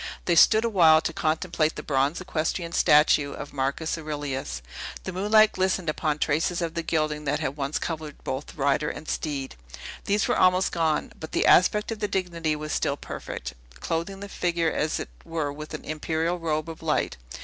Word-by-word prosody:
They 175 - +3
stood 220 +7 +6
awhile 170 -8 +6
to 165 - -3
contemplate 160 0 0
the - - -6
bronze 140 +2 +1
equestrian 170 -1 -2
statue 150 -2 +4
of 145 - -8
Marcus 140 +4 -1
Aurelius. 145 - -4 0.4
The 190 - -4
moonlight 215 +3 +5
glistened 185 -2 0
upon 155 -1 -1
traces 160 +4 0
of 165 -2 -2
the 170 - -2
gilding 155 -2 -1
which 145 +1 0
had 135 - -2
once 140 0 -2
covered 155 -3 -5
both 130 +2 -5
rider 140 +1 +1
and 155 - -8
steed; 140 -4 -3 0.5
these 205 +1 +1
were - - +2
almost 185 +1 +4
gone, 160 -2 0
but 160 - -8
the - - +2
aspect 210 +5 +4
of 220 - -4
dignity 175 -6 -1
was 155 0 -5
still 140 - 0
perfect, - - -6 0.3
clothing 170 +4 -3
the 200 - -6
figure 170 -4 0
as 155 +1 -1
it - - -5
were 155 -3 -3
with 155 +1 -7
an - - -9
imperial 160 +3 -1
robe 155 -2 -1
of 165 -1 -8
light. 155 - 0
160 Hz, 180 wpm, -26 LUFS, 150-175 Hz, 0.5 s, stood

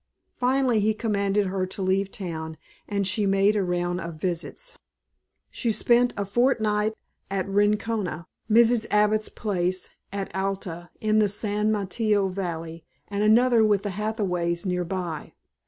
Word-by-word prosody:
Finally 255 -2 +2
he 215 +1 +2
commanded 205 -2 0
her 190 0 -1
to 190 +1 -5
leave 190 +1 +1
town, 160 -5 -6 0.3
and 200 -1 0
she 205 +1 +2
made 195 +2 +3
a 205 - +2
round 175 0 -1
of 170 -1 -6
visits. 180 - -3 0.8
She 235 - -1
spent 240 +2 +3
a 200 - -1
fortnight 215 -1 +1 0.3
at 195 -1 -2
Rincona, 205 -3 0 0.2
Mrs. 230 +1 +4
Abbott's 210 +1 +2
place 185 -3 -2 0.2
at 200 -1 -4
Alta, 190 -3 -3
in 215 0 +2
the 210 -1 +3
San 210 +1 0
Mateo 205 0 +1
valley, 165 -3 -5 0.3
and 205 0 -1
another 230 +2 +5
with 205 -2 +3
the 205 - -2
Hathaways 185 -4 -1
near 180 -1 0
by. 175 -3 -4
200 Hz, 140 wpm, -25 LUFS, 185-215 Hz, 0.8 s, another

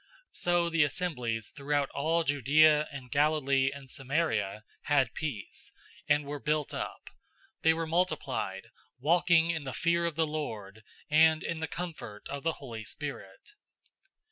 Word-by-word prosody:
009:031 - - -33 0.3
So 175 -1 +2
the 165 -2 +4
assemblies 125 - -2
throughout 145 -1 0
all 165 +4 +1
Judea 150 +2 +4
and 130 -3 -9
Galilee 140 -2 +3
and 140 -1 -10
Samaria 130 -7 -1 0.3
had 135 -5 +3
peace, 140 -11 -5 0.4
and 145 0 +3
were 145 +1 -5
built 150 0 -1
up. - - -6 0.5
They 160 0 +4
were 165 0 -2
multiplied, 145 - -1 0.3
walking 165 +3 +4
in 160 -3 -3
the 130 -2 -5
fear 170 +4 +1
of 165 - -4
the 165 0 +2
Lord 110 -10 -5 0.3
and 160 +1 +5
in 170 - -3
the 160 - -2
comfort 155 -12 -7
of 140 0 -4
the 165 +1 0
Holy 115 -7 -8
Spirit. 145 - -8
150 Hz, 145 wpm, -30 LUFS, 130-160 Hz, 0.5 s, and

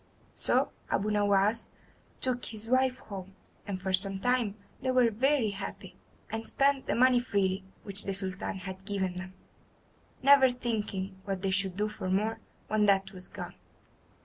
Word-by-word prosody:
So - - +1 0.2
Abu 210 +2 +1
Nowas 205 +1 +2 0.5
took 250 -1 -1
his 220 0 -6
wife 255 +1 +2
home, 190 -2 -8 0.3
and 195 -2 -3
for 190 0 -2
some 195 +1 +3
time 245 -3 +1 0.3
they 260 - -1
were 250 -2 +4
very 255 0 +2
happy, 195 0 -7 0.4
and 225 0 -4
spent 275 -1 +2
the - - +1
money 250 0 +5
freely 195 -5 0 0.2
which 200 -1 +1
the 195 - -1
Sultan 190 0 -2
had 190 0 -7
given 190 -3 -2
them, 185 +1 -7 0.9
never 275 -1 +7
thinking 205 -6 -3
what 195 -2 -3
they 195 - +1
should 190 -1 +2
do 210 +1 +1
for 210 -3 -5
more 215 +4 0 0.3
when 210 -1 +2
that 195 -1 +3
was 185 -1 -5
gone. - - -7
205 Hz, 160 wpm, -30 LUFS, 190-240 Hz, 0.9 s, never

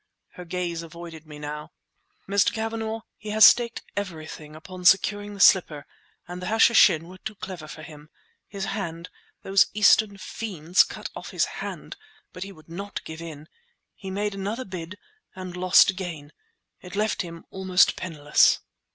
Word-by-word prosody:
Her 180 - -11
gaze 170 -1 -3
avoided 165 -1 -10
me 150 -1 -10
now. 150 0 -7 0.5
"Mr. 200 0 +3
Cavanagh, 225 0 -3 0.2
he 210 - -9
has 215 0 +7
staked 235 -1 +4
everything 160 -5 -6
upon 180 +3 -10
securing 205 +2 +3
the - - -11
slipper—and 175 0 +1
the 180 - -5
Hashishin 215 -7 +5
were 185 +1 -12
too 215 - -6
clever 185 -5 -8
for 155 - -10
him. 150 -1 -12 0.4
His 200 -2 -5
hand—those 190 +1 -1
Eastern 210 -1 +4
fiends 185 -4 +1
cut - - -8
off - - -7
his - - +1 0.2
hand! - - -7 0.4
But 180 - -10
he 195 +1 -5
would 155 -5 -17
not 200 +5 -6
give 160 +1 -8
in. 155 -2 -9 0.5
He 195 - -9
made 205 +2 -2
another 205 +6 -4
bid—and 185 - -10
lost 185 +1 +5
again. 170 -6 -7 0.5
It 180 +1 -10
left 215 +1 0
him 170 -2 -9
almost 190 -1 +3
penniless." 150 -4 +3
185 Hz, 150 wpm, -25 LUFS, 165-205 Hz, 0.5 s, has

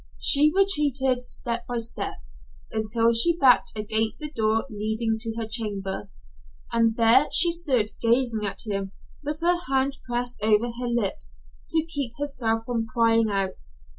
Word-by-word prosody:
She 300 +1 +4
retreated, 275 -10 +2
step 235 -1 -4
by 245 - -3
step, 230 0 -3 0.6
until 225 +1 +1
she 335 +9 +5
backed 265 -5 +4
against 220 +1 -1
the 300 -1 -6
door 220 -3 0
leading 220 +1 -3
to 225 0 -3
her 225 -1 -4
chamber, 205 - -3 0.6
and 230 -1 +1
there 235 +5 +5
she 345 0 +6
stood 270 -11 0
gazing 235 -2 +1
at 200 +2 -3
him 195 -2 -4 0.3
with 300 +2 -5
her 350 +1 +2
hand 270 0 0
pressed 245 +1 -2
over 220 +2 +2
her 250 - -3
lips 195 - -3 0.3
to 320 -1 +1
keep 285 -7 -5
herself 245 -6 -2
from 230 -2 -3
crying 230 -1 +2
out. 195 - -3
230 Hz, 150 wpm, -24 LUFS, 220-270 Hz, 0.6 s, she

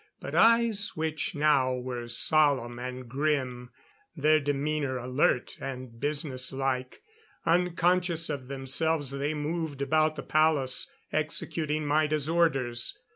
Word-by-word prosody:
But - - -7
eyes 230 -3 +4
which 155 -1 -2
now 140 -4 +3
were 125 -1 -5
solemn 125 -1 +2
and 125 0 -6
grim. 130 -2 -1 0.5
Their 155 0 +4
demeanor 145 -1 -1
alert 125 +1 0
and 130 -3 -7
business 140 -3 -2
like. 130 -1 -3 0.4
Unconscious 175 0 +2
of 140 -4 -4
themselves 140 +2 -1
they 140 +3 -2
moved 150 -1 -3
about 155 +3 +2
the - - -6
palace, 155 -4 +2 0.2
executing 155 0 -1
Maida's 150 0 +1
orders. 135 -8 +1
145 Hz, 115 wpm, -28 LUFS, 130-155 Hz, 0.5 s, eyes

